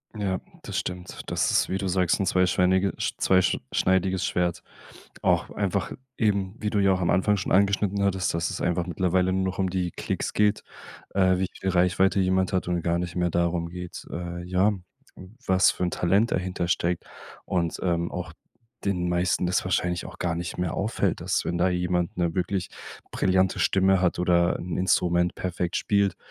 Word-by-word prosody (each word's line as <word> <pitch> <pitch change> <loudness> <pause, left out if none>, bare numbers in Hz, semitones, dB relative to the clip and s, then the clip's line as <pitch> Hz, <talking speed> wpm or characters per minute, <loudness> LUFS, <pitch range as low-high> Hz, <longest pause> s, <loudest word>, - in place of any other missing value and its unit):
Ja, 95 -3 -1 0.2
das - - -5
stimmt. 90 0 -5
Das - - 0
ist, - - +2
wie 95 - -1
du 95 - -2
sagst, 90 -1 +1
'n 100 - +1
zweischweinige 90 +1 +2
Sch - - -2
zweisch 95 -1 +3
schneidiges 95 0 +1
Schwert 90 -1 0 0.6
auch - - +2
einfach 100 -1 -2 0.3
eben, 100 -4 +1
wie 105 - -1
du 105 - -1
ja 100 -1 +4
auch 95 - -1
am 85 - +1
Anfang 100 +3 +3
schon 95 - -3
angeschnitten 100 0 +2
hattest, 95 -2 +1
dass 85 +1 -1
es - - -5
einfach 85 0 0
mittlerweile 90 +1 +1
nur 95 0 0
noch 95 -1 -3
um 95 -2 0
die 90 -1 -1
Klicks - - -3
geht, 105 -1 +2 0.5
äh, 95 -2 +4
wie 95 - 0
viel 95 - -1
Reichweite 90 +2 +3
jemand 95 0 +1
hat 95 - 0
und 90 -1 -1
gar 85 +1 +1
nicht 90 0 -4
mehr 90 -1 0
darum 85 0 0
geht, 90 0 -8
äh, 85 0 -5
ja, 90 +4 +2 0.8
was 95 0 +5
für - - -4
'n 90 - +1
Talent 100 +6 +2
dahinter 90 -1 -1
steckt 85 0 0 0.4
und, 85 -2 -1
ähm, 85 -2 0
auch 85 -2 -5 0.5
den 90 -3 0
meisten 90 +1 +1
das 90 +2 +1
wahrscheinlich 90 -1 -1
auch - - -10
gar 85 -2 -1
nicht 85 0 -5
mehr 90 -2 -1
auffällt, 110 +4 -1
dass - - -1
wenn 85 - -1
da 90 +2 +3
jemand 90 +1 -1
'ne 85 -2 0
wirklich 90 0 -1 0.4
brillante 95 0 +2
Stimme 95 -1 +3
hat 90 -2 +1
oder 85 -1 +2
'n 90 -1 -4
Instrument 90 -1 +2
perfekt 90 0 -2
spielt, 100 -2 +1
90 Hz, 185 wpm, -26 LUFS, 90-95 Hz, 0.8 s, was